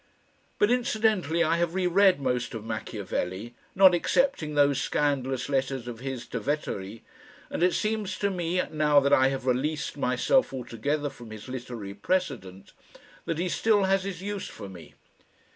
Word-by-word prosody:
But 205 - +3
incidentally 215 - +1
I 165 +1 +2
have 170 0 -1
re 190 -1 +1
read 185 -1 +4
most 125 -3 -1
of 110 -1 -6
Machiavelli, 110 -1 -4 0.2
not 190 -1 +7
excepting 175 - +1
those 145 -2 +3
scandalous 135 -3 0
letters 135 -3 -1
of 120 -2 -6
his 130 -1 -5
to 125 - -3
Vettori, 110 -5 -3 0.5
and - - -3
it 180 0 +3
seems 215 -3 -1
to 200 -1 0
me, 180 0 0
now 150 -1 +4
that 140 0 +2
I 130 0 +6
have 135 -1 -3
released 150 +5 -1
myself 135 - +2
altogether 135 +4 -2
from 120 -2 -12
his 110 +1 -9
literary 120 -6 -6
precedent, 100 - -3 0.5
that 165 - -2
he 175 +2 -1
still 205 +5 +2
has 190 0 +2
his 190 -2 -5
use 205 -1 -4
for 100 - -9
me. 90 -4 -12
145 Hz, 160 wpm, -27 LUFS, 125-185 Hz, 0.5 s, not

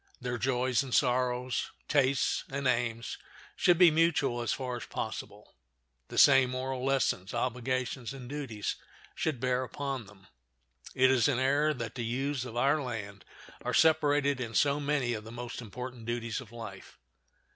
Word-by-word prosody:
Their 125 -1 -3
joys 125 0 +1
and 135 -3 -2
sorrows, 125 -1 +1 0.2
tastes 135 -2 +2
and 140 +1 -3
aims, 115 -2 -1 0.4
should 175 -2 +4
be 175 -2 +7
mutual 150 -6 +2
as 120 - -1
far 125 -2 -3
as - - -8
possible. - - -6 0.5
The - - -8
same 135 -2 +7
moral 130 0 -3
lessons, 130 -7 0
obligations, 125 0 -2
and 135 -2 -8
duties 130 -7 -4 0.4
should 155 -6 -2
bear 130 +1 +1
upon 130 -2 -4
them. 95 -2 -17 0.7
It 130 0 +5
is 130 -1 +4
an 140 -4 +1
error 140 +4 +3
that 115 -3 -5
the 120 - -4
youths 130 +3 -2
of 120 -1 -7
our 140 +5 +3
land 105 -6 -6 0.4
are - - -1
separated 145 -4 +3
in 115 -2 -5
so 145 0 +3
many 140 -4 0
of 110 -1 -5
the 110 - -10
most 120 +1 -6
important 125 +1 -8
duties 115 0 -2
of 115 -4 -13
life. 115 -1 -9
130 Hz, 160 wpm, -30 LUFS, 120-140 Hz, 0.7 s, be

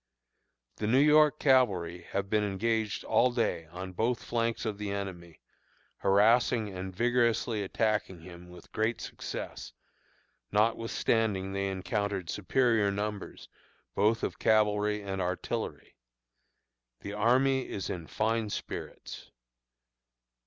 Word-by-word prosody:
The 105 - -2
New 120 +4 +4
York 150 +1 +5
cavalry 95 - +2
have 100 0 -2
been 105 +1 +1
engaged 110 +2 -1
all 125 +1 +3
day 90 -9 -1
on 90 +3 -7
both 115 +6 0
flanks 115 0 -1
of 105 -2 -3
the 105 -1 -3
enemy, 95 -4 -6 0.6
harassing 110 +2 +3
and 95 +1 -5
vigorously 115 +1 +1
attacking 100 -3 -1
him 90 0 -12
with 90 - -14
great 110 +2 0
success, - - -7 0.8
notwithstanding 110 -2 +1
they 100 0 -1
encountered 95 -1 -2
superior 110 0 +2
numbers, 105 0 -4 0.5
both 110 +3 +2
of - - -3
cavalry 105 -1 +2
and 95 -1 -3
artillery. 90 0 -4 1.1
The 100 - -6
army 130 +5 +2
is 95 -4 -4
in 85 -3 -5
fine 110 +3 0
spirits. - - -7
105 Hz, 115 wpm, -30 LUFS, 95-115 Hz, 1.1 s, York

